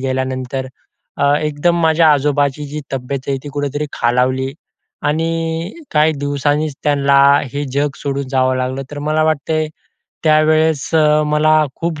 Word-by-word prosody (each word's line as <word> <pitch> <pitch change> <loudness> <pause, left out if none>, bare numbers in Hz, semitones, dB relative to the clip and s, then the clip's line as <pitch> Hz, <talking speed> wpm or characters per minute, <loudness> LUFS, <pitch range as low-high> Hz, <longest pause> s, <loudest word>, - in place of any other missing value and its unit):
गेल्यानंतर, 130 0 -3 0.5
अ, 140 +1 +3
एकदम 155 +3 0
माझ्या 160 0 +4
आजोबाची 145 0 0
जी 150 +2 -6
तब्येत 135 +1 -3
आहे, 135 - 0
ती - - -6
कुठेतरी 145 +1 -2
खालावली 130 +2 0 0.5
आणि 165 +3 -1 0.2
काही 155 +1 +3
दिवसांनीच 145 +1 -1
त्यांना 140 -1 +3 0.3
हे 145 +1 -2
जग 145 +1 +1
सोडून 140 -1 -3
जावं 130 -1 +2
लागलं. 130 +1 -2
तर 145 - -6
मला 155 0 +2
वाटते, 155 0 0 0.6
त्यावेळेस 155 -1 +3
अ, 155 -1 +4
मला 155 +1 +3
खूप 165 -2 -3
145 Hz, 135 wpm, -17 LUFS, 135-155 Hz, 0.6 s, माझ्या